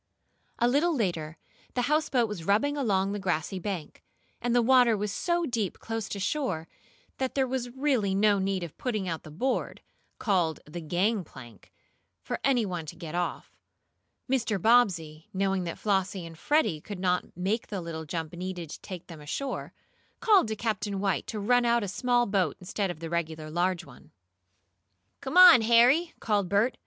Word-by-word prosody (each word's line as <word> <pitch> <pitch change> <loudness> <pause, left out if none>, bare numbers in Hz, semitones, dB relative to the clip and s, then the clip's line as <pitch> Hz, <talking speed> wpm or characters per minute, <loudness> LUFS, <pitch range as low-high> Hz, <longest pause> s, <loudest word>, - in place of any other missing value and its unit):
A 240 - +3
little 300 +7 +2
later 170 - -2 0.4
the 245 - +1
houseboat 285 -4 +2
was 210 -6 -6
rubbing 215 - +2
along 200 -8 +1
the 205 - -3
grassy 185 0 -2
bank, 180 -4 -5 0.4
and 240 0 0
the 245 - +5
water 245 -2 +5
was 205 0 -2
so 345 - 0
deep 230 - -2
close 225 -1 -4
to 200 - -4
shore 190 - -2 0.5
that 260 -1 -2
there 270 -1 +3
was 255 -1 -3
really 250 -7 0
no 205 0 +4
need 190 -1 -1
of 170 - -8
putting 215 -7 -2
out 165 -2 -3
the - - -12
board, 245 - -2 0.4
called 175 - +1
the 170 +3 -7
"gangplank," 175 - -3 0.5
for - - -3
any 250 -5 +3
one 175 -5 -4
to - - -7
get 165 -3 -8
off. 175 0 -3 0.7
Mr. 235 -6 0
Bobbsey, 175 -9 +2
knowing 195 -1 0
that 170 - -5
Flossie 195 -3 -1
and 165 0 -10
Freddie 215 - +1
could 205 +3 -7
not 180 -2 -1
make 200 +6 -1
the 200 -2 -4
little 165 -2 -6
jump 160 +1 -4
needed 175 -2 -5
to - - -8
take 180 -3 -8
them 165 -3 -11
ashore, 265 - -4 0.5
called 410 - +5
to 220 - -2
Captain 205 -2 -2
White 195 -2 -1
to 215 - -4
run 245 +4 +3
out 235 -1 +2
a - - -3
small 240 +5 +1
board 190 -7 0
instead 195 +2 -2
of 170 -2 -6
the 165 - -5
regular 160 -2 -3
large 175 +1 0
one. 130 -5 -16 1.1
"Come 270 +6 -3
on, 360 -9 +10
Harry!" 245 +9 +4
called 205 -4 0
Bert. 210 +5 +2
200 Hz, 175 wpm, -28 LUFS, 175-240 Hz, 1.1 s, on